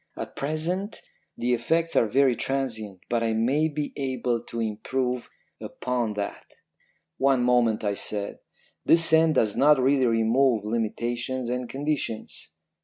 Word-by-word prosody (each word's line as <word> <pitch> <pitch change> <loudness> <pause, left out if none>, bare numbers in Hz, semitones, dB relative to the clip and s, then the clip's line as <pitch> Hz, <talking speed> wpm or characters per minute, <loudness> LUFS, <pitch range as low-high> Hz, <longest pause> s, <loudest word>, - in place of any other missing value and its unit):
At - - -7
present 170 +8 -3 0.4
the 125 +1 0
effects 165 +8 0
are 115 - +4
very 130 +2 +3
transient, 110 -8 -3
but 120 -1 0
I 115 -1 0
may 130 +8 +1
be 150 -1 -4
able 130 -4 -2
to 115 - -6
improve 125 +3 -2 0.3
upon 120 -4 -3
that.' 100 -1 -6 0.6
"'One 135 -2 +3
moment,' 120 -3 +2
I 100 -1 0
said. 100 0 -1 0.4
'This 165 0 +5
scent 160 -1 +5
does 105 -2 +2
not 150 +1 +5
really 130 0 +3
remove 115 0 +2
limitations 120 +3 -2
and 125 -1 -3
conditions.' 140 -5 -4
125 Hz, 135 wpm, -25 LUFS, 115-140 Hz, 0.6 s, This